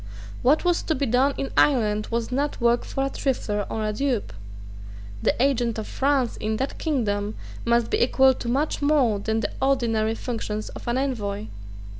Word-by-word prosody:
What 295 +7 +3
was 350 -1 +2
to 320 - -1
be 280 - 0
done 260 +3 +2
in 275 - -3
Ireland 215 -6 +3
was 230 +1 -2
not 285 +3 -1
work 235 0 +2
for 270 - -2
a - - -1
trifler 210 -8 -1
or 220 -1 -2
a 215 - -1
dupe. 240 - -1 0.9
The - - +1
agent 245 -3 +1
of 220 - -3
France 270 -3 0
in 215 0 -2
that 270 +3 -3
kingdom 210 -9 -1 0.3
must 235 0 +2
be - - +1
equal 265 +2 +5
to 240 - -5
much 285 +6 0
more 280 -8 +3
than 220 +2 -1
the - - -2
ordinary 225 -5 +1
functions 215 -3 -4
of - - -10
an 240 +1 +1
envoy. 215 -6 -2
240 Hz, 180 wpm, -24 LUFS, 220-270 Hz, 0.9 s, equal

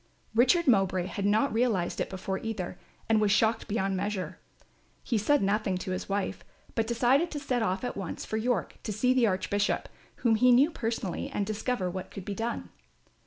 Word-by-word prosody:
Richard 260 +10 +4
Mowbray 195 -6 +3
had 200 +1 -2
not 215 +6 +2
realised 225 -7 +1
it - - -2
before 190 0 -3
either, 205 -6 -4 0.3
and 220 -1 +3
was 210 -1 +3
shocked 220 +2 +2
beyond 195 -3 0
measure. 200 0 -3 0.6
He 230 -4 0
said 290 +6 +3
nothing 200 -1 +1
to 185 - -5
his 185 - -4
wife, 200 0 -2 0.3
but 225 -1 0
decided 255 +8 +3
to 295 - -4
set 255 -4 -1
off 190 -1 0
at 245 - -3
once 190 -4 -5
for 220 - -2
York 225 -3 -1
to 215 - -4
see 250 +5 +2
the 250 -3 +4
Archbishop, 200 +1 0 0.4
whom 225 -2 +5
he 250 +3 +5
knew 270 +7 +5
personally, 225 - -3
and 205 - -1
discover 215 -1 -1
what 185 +1 -5
could 195 - -8
be 205 - -3
done. 230 +3 -3
215 Hz, 190 wpm, -29 LUFS, 195-240 Hz, 0.6 s, whom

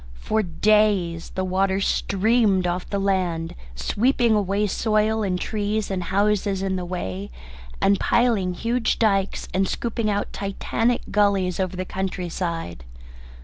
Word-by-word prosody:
For 220 - 0
days 190 -2 +2
the 190 - -1
water 190 +1 +1
streamed 200 0 +2
off 180 +1 -2
the 200 - -1
land, 185 -4 0 0.2
sweeping 235 - +2
away 205 0 +1
soil 215 +1 +1
and 185 -3 -1
trees 210 0 -2
and 180 -2 -2
houses 200 0 +1
in 190 -1 0
the 180 -1 -3
way, 100 - -4 0.5
and 200 0 +3
piling 215 -7 +2
huge 230 +3 0
dykes 195 -3 +1
and 190 +1 +2
scooping 230 -2 -2
out 205 0 -2
Titanic 225 +4 -1
gullies 200 -3 +2
over 185 -1 -1
the 185 - -3
country 185 -1 -3
side. 165 - -4
195 Hz, 140 wpm, -23 LUFS, 180-215 Hz, 0.5 s, and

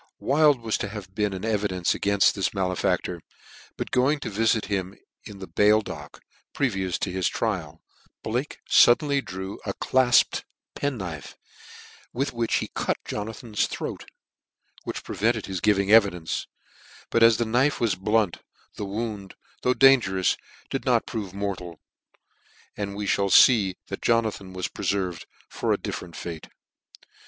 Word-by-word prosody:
Wild 145 -2 +3
was 110 -1 -1
to 105 - -3
have 95 -3 -8
been 105 0 0
an 95 +2 -5
evidence 100 -5 0
againft 100 -1 +3
this 100 +1 -2
malefactor; 90 -2 -1 0.6
but - - -4
going 135 +4 +2
to - - -4
vifit 110 +1 +1
him 95 -1 -3 0.3
in 105 - -9
the 95 - -7
bail 105 +3 +4
dock, - - -9 0.3
previous 95 -9 -1
to 95 - -3
his 95 -1 0
trial, 85 -9 -3 0.4
Blake 125 +7 -3
fuddenly 140 +3 +5
drew 95 +1 -6
a - - -4
clafped 130 -1 +3 0.3
penknife, 95 - -4 0.8
with 135 +2 -2
which 115 -1 0
he - - -2
cut - - -1
Jonathan's 110 +1 -3
throat, - - -6 0.8
which - - -5
prevented - - 0
his 95 -2 -4
giving 100 -1 +2
evidence; 100 -7 +3 0.6
but 115 - +2
as 115 -1 +7
the 120 - 0
knife 125 +6 +2
was 115 -4 +2
blunt, 105 0 0 0.4
the 105 - -3
wound, 105 -1 -5 0.3
though 125 0 +2
dan 135 -1 +7
gerous, 95 -3 0 0.4
did - - -2
not - - +2
prove 100 -4 -5
mortal 95 -3 -4
j 80 - -24 1.0
and 100 -1 -4
we 105 0 -4
mall 100 0 +1
fee 100 -4 +6
that - - -5
Jonathan 110 -5 0
was 95 -1 -3
prcfcrved 90 -5 -2 0.2
for - - -2
a - - +3
different 85 -2 -6
rattr. 85 -3 -7
105 Hz, 150 wpm, -25 LUFS, 95-115 Hz, 1.0 s, as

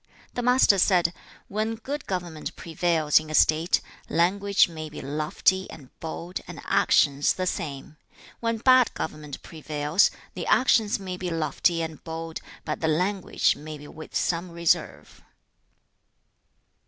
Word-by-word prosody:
The 245 - -2
Master 250 -5 +5
said, 175 -2 +3 0.3
'When 215 +2 -2
good 280 +6 -6
government 175 -4 -4
prevails 165 -3 +2
in 155 0 -10
a 155 - -2
state, 160 +4 +4 0.3
language 200 +3 +3
may 155 -2 -7
be 150 - -9
lofty 155 +6 0
and 135 -5 -12
bold, 170 +2 -5
and 175 -4 -8
actions 140 -1 +3
the 185 - -2
same. 150 -4 -4 0.4
When 230 -1 -1
bad 255 +1 +5
government 150 -2 -6
prevails, 155 +2 +1 0.2
the - - -5
actions 225 -5 +3
may 185 -2 -5
be 180 0 -3
lofty 165 +1 0
and 160 -1 -7
bold, 165 0 -5 0.3
but 155 - -3
the 160 - +1
language 180 +5 +1
may 155 +1 -8
be 145 0 -12
with 155 +1 -11
some 175 +1 0
reserve.' 170 -1 -1
170 Hz, 140 wpm, -26 LUFS, 155-190 Hz, 0.4 s, Master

